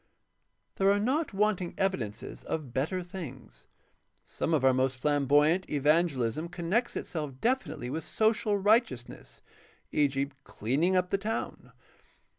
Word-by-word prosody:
— - - -49
There 195 0 +4
are 200 +1 +4
not 275 +9 0
wanting 195 -3 0
evi 195 0 +2 0.2
dences 105 - -10
of 145 -7 -4
better 160 +8 -1
things. 170 -9 -9 0.6
Some - - -3
of 145 -5 +2
our 130 - +6
most 130 0 0
flamboyant 145 +5 +3
evangelism 150 -1 +1
connects 185 +8 -1
itself 150 -6 -4
definitely 235 - -1
with 160 +2 -3
social 220 +1 +1
righteousness, 205 - 0 0.5
e.g., 140 -2 +2 0.2
''cleaning 145 - 0
up 180 0 +1
the 195 - +1
town." 220 +3 -4
165 Hz, 130 wpm, -29 LUFS, 135-195 Hz, 0.6 s, our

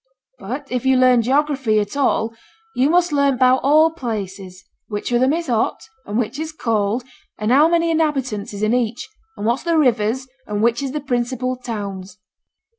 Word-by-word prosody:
'But 270 +6 -6
if 250 -2 -1
you 265 -1 +3
learn 255 -2 +5
geography 265 -3 +1
at 205 +2 -3
all, 230 -5 +1 0.4
you 260 +4 +3
must 350 0 +3
learn 280 -2 +2
'bout 255 0 +4
all 310 +4 +4
places: 195 - -6 0.2
which 210 +2 -4
of 240 0 +2
them 260 +1 +3
is 335 +1 -2
hot, 235 -4 0 0.3
and 205 +2 -2
which 240 +3 -2
is 315 0 -4
cold, 225 -5 -1 0.3
and 215 +2 -1
how 290 +5 +6
many 335 0 +2
inhabitants 270 -10 -1
is 205 0 -5
in 215 +2 +2
each, 240 -1 -1 0.3
and - - -4
what's 235 +3 +1
the 335 -1 +1
rivers, 250 -2 +1 0.2
and 210 0 -2
which 235 +2 +2
is 275 -1 -4
the 300 - -3
principal 255 -1 -2
towns.' 200 -6 -6
250 Hz, 185 wpm, -20 LUFS, 215-280 Hz, 0.4 s, how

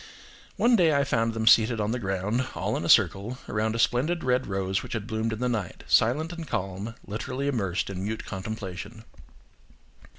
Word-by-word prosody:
One 240 +1 +4
day 165 -7 +4
I 140 - +3
found 115 -4 0
them 110 0 -1
seated 115 0 +5
on 105 +1 0
the 125 - -1
ground, 100 +5 -1
all - - -1
in - - -2
a - - -3
circle, 110 +6 +4
around 110 +2 -1
a - - -1
splendid 140 +9 +1
red 125 0 +1
rose 95 -1 -1
which - - -7
had 110 -4 -3
bloomed 110 0 -2
in 110 - -3
the 125 +2 -1
night; 110 -7 -3
silent 150 +9 +2
and 165 -2 -7
calm, 95 +1 -3
literally 130 +6 -4
immersed 100 -10 -1
in 95 -1 -5
mute 110 +2 -4
contemplation. 95 +1 -6
110 Hz, 190 wpm, -27 LUFS, 100-125 Hz, -, seated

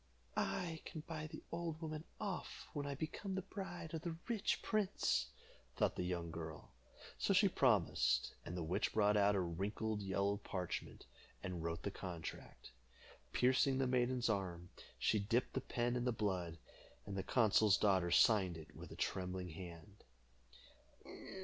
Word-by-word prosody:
"I 165 -3 -1
can 160 -5 -6
buy 155 -1 -5
the 155 0 -9
old 165 -2 -3
woman 155 -1 -4
off 200 -4 -4
when 145 -3 -2
I 140 - -2
become 175 +7 -3
the 190 - -1
bride 175 -5 -6
of 160 - -2
the 165 -1 -3
rich 225 -4 0
prince," 215 -3 +1 0.5
thought - - +2
the - - -2
young 90 -2 -2
girl. 80 -2 -7 0.5
So - - +3
she - - +7
promised, - - +3
and 90 - -5
the 85 - -1
witch 90 +6 0
brought 105 -1 +4
out 100 0 +5
a - - +3
wrinkled 105 +5 -1
yellow 100 +1 +1
parchment, 90 -3 -4 0.4
and 90 -3 -3
wrote 85 0 -2
the 100 - -1
contract. 90 -4 -7 0.6
Piercing 130 +1 +4
the 135 - +2
maiden's 125 -1 +2
arm, 90 -5 -1 0.3
she 110 - +3
dipped 115 +5 +1
the 130 - 0
pen 120 -1 0
in 125 0 0
the 125 - +3
blood, 95 -7 -1 0.5
and 100 - -5
the 95 - 0
consul's 105 -1 +5
daughter 95 -4 +3
signed 95 -1 +5
it 80 - -11
with - - -9
a - - -7
trembling 90 -1 -2
hand. 85 +4 -9
105 Hz, 160 wpm, -39 LUFS, 90-145 Hz, 0.6 s, she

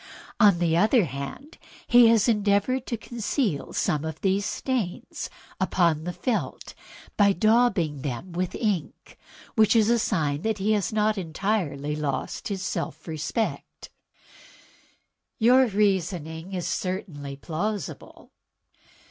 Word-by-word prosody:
On 205 -5 +6
the 170 -2 +1
other 215 +4 +4
hand, 140 - -7 0.3
he 240 -1 +7
has 225 -1 +4
endeavored 210 +4 +1
to 235 - -2
conceal 220 - -2
some 150 -1 0
of 160 -1 -5
these 195 +1 +1
stains 240 -9 -3 0.3
upon 170 -4 +1
the 180 - -2
felt 235 +5 -3 0.4
by 200 -1 +5
daubing 200 - +2
them 140 +6 -5
with 180 +1 -2
ink, 200 -9 -3 0.4
which 220 -1 +4
is 225 0 +4
a 235 - +3
sign 150 -9 0
that 220 +1 -1
he 205 +2 0
has 205 -4 +1
not 215 -1 +1
entirely 160 -5 -2
lost 150 -3 -3
his 195 -3 -3
self - - -4
respect." 165 +8 -4 1.5
"Your 255 +3 +5
reasoning 185 -4 -1
is 180 -2 -2
certainly 160 -7 -4
plausible." 185 +9 -5
195 Hz, 120 wpm, -26 LUFS, 160-220 Hz, 1.5 s, he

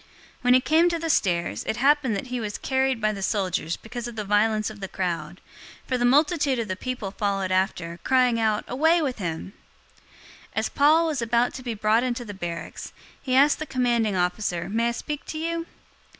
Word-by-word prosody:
021:035 - - -27 0.3
When 250 0 +4
he 255 - +5
came 325 +5 +4
to 340 - -1
the 330 0 -1
stairs, 170 - 0
it 220 - -2
happened 275 -3 +3
that 200 - -3
he 250 - -1
was 210 -2 -4
carried 265 -2 0
by 215 -1 +1
the 200 - -6
soldiers 185 -4 -1
because 240 +1 -7
of 240 - -8
the 215 - -3
violence 215 +1 +1
of 210 - -12
the 195 - -5
crowd; 175 -3 -3 0.4
021:036 - - -30
for 255 - +1
the 240 - +2
multitude 290 +1 +3
of 230 -2 -2
the 185 - -2
people 240 -2 -4
followed 195 -2 -1
after, 180 -3 -1
crying 250 -3 +3
out, 215 -2 +1
"Away 320 +7 +3
with 260 -5 -2
him!" 170 +1 -4 0.5
021:037 - - -29 0.4
As - - 0
Paul 310 +4 +4
was 305 -6 -1
about 235 +1 +1
to - - -7
be 240 -3 -4
brought 215 +2 +2
into 245 -1 -2
the 205 - -7
barracks, 175 -3 -6 0.3
he 255 -2 -1
asked 285 +2 +5
the 310 - -4
commanding 240 -5 +1
officer, 180 -1 -1
"May 230 +3 +1
I - - 0
speak 295 +5 -5
to 310 - -5
you?" 335 +1 -3
230 Hz, 215 wpm, -25 LUFS, 195-265 Hz, 0.5 s, he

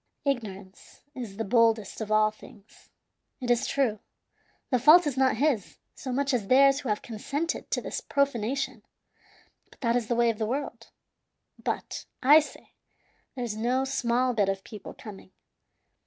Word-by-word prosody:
"Ignorance 205 -8 -5
is 225 -6 -7
the 225 - -1
boldest 225 -2 +2
of 215 -1 -4
all 215 0 +4
things. 210 -1 -18 0.5
It 245 -2 -1
is 240 - +2
true, 245 -7 0 0.7
the 250 - +3
fault 310 +8 +7
is 290 -4 -1
not 260 -3 +2
his, 265 -7 0 0.2
so 260 - -6
much 275 +2 0
as 220 -6 -1
theirs 275 +3 +5
who 270 - -5
have 210 - -1
consented 280 +8 -4
to - - -1
this - - -5
profanation, 270 -2 -1 0.9
but - - -21
that 235 -2 +1
is 240 -3 0
the 240 - 0
way 235 0 +3
of 220 - -10
the 220 - -1
world. 275 +5 -4 0.7
But, - - -4 0.2
I 290 +4 +8
say, 305 - -9 0.6
there's 240 -4 -3
no 250 +4 0
small 250 -1 0
bit 205 -4 +1
of 195 0 -3
people 210 -3 -10
coming. 195 -3 -12
240 Hz, 160 wpm, -27 LUFS, 215-270 Hz, 0.9 s, I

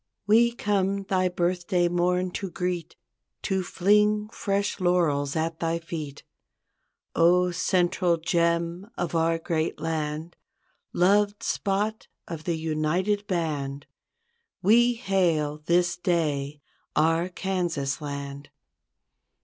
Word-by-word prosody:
We 230 +3 +5
come 200 -3 0
thy 185 -1 +1
birthday 175 0 0
morn 180 +1 +1
to 195 +1 -4
greet, 180 -1 -3 0.5
To 190 0 0
fling 210 +3 +2
fresh 200 -2 -2
laurels 165 -6 +1
at 160 0 -1
thy 165 0 0
feet. 155 -4 -7 0.9
0, 180 +2 +4
central 175 0 +1
gem 170 +3 0
of 175 - -2
our 165 0 +2
great 165 -1 -2
land, 160 +1 -3 0.6
Loved 205 +3 +2
spot 205 +2 -1 0.2
of 160 -2 -7
the 170 -2 0
united 165 +6 0
band; 145 -6 -2 0.8
We 240 +5 +5
hail 170 -9 0
this 175 0 +2
day, 150 -5 -1 0.3
our 165 +3 +2
Kansas 175 -8 -2
Land. 140 -1 -6
175 Hz, 105 wpm, -26 LUFS, 160-190 Hz, 0.9 s, We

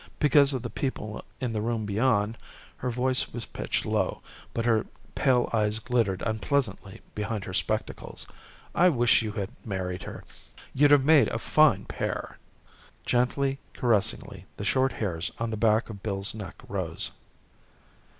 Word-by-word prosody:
Because 145 -1 +5
of 130 -4 -2
the - - -4
people 110 -6 -3 0.2
in 125 -3 -2
the 105 - -1
room 115 -1 -1
beyond, 105 0 +1 0.4
her 125 - -2
voice 125 +2 0
was 120 0 -5
pitched - - -3
low, - - 0 0.3
but 115 - -2
her 115 -3 +2 0.3
pale 125 -2 +3
eyes 105 -1 +2
glittered 115 -5 0
unpleasantly 110 -3 -1
behind 105 0 -3
her 95 - -6
spectacles. 110 +3 -2 0.5
"I 180 +2 +5
wish 120 -7 +4
you 110 -2 -3
had 100 0 -3
married 95 -3 -3
her. - - -8 0.5
You'd 145 +2 +5
have 145 -2 +6
made 155 -2 +6
a - - -2
fine - - +4
pair." - - -4 0.7
Gently, 135 +3 +1 0.2
caressingly, 115 -5 0
the 100 - -4
short 130 +6 +2
hairs 90 -5 -2
on 115 0 -2
the - - -1
back 110 +1 +3
of 100 -2 -10
Bill's 100 -1 -1
neck 105 -5 -7
rose. - - -3
115 Hz, 150 wpm, -27 LUFS, 105-130 Hz, 0.7 s, have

